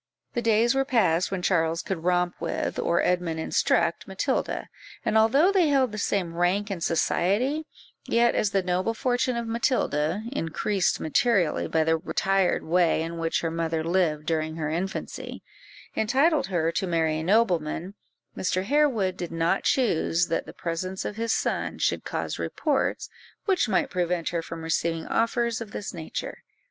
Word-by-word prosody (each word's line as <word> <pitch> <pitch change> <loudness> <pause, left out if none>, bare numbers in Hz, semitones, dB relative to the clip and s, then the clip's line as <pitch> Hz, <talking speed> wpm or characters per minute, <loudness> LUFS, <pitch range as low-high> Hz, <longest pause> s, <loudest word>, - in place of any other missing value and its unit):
The 240 - -1
days 230 +1 +3
were 270 0 +2
past 215 -10 +2
when 190 -2 -3
Charles 165 -2 +1
could 180 -4 -4
romp 180 0 +2
with, - - -2
or 170 - +1
Edmund 175 -3 0
instruct, 160 - +1
Matilda; - - -2 0.4
and 220 -2 0
although 270 - +5
they 370 -5 +3
held 270 -5 +2
the 215 - -5
same 185 -4 -1
rank 185 +4 0
in 185 -4 -4
society, 220 - +1 0.4
yet 235 +1 +3
as 210 - +1
the 195 -1 0
noble 185 +5 0
fortune 250 0 0
of 235 - -2
Matilda 215 - 0
(increased 190 - 0
materially 185 +1 +1
by 160 -1 +2
the 160 +1 +2
retired 190 +2 +1
way 170 -1 +2
in 165 +1 -5
which 165 0 0
her 165 - -2
mother 165 -1 -1
lived 165 -3 +1
during 160 -1 -1
her 155 -2 -2
infancy) 180 +4 -4 0.5
entitled 275 - +2
her 170 -3 0
to 190 - -2
marry 160 -2 +1
a - - -3
nobleman, 180 -3 +1 0.4
Mr. 185 0 -1
Harewood 240 -7 +2
did 175 -2 -5
not 165 +3 0
choose 175 -8 +2
that 165 - -1
the - - -7
presence 185 +2 -4
of 210 - -4
his 230 0 -1
sons - - -1
should - - +1
cause - - -4
reports 290 -4 -1 0.4
which 375 - +2
might 190 - +1
prevent 175 -2 -1
her 170 -1 -2
from 165 0 -8
receiving 165 0 -1
offers 230 0 0
of 215 -3 -8
this 205 - -5
nature. 165 -3 -6
185 Hz, 165 wpm, -26 LUFS, 165-230 Hz, 0.5 s, although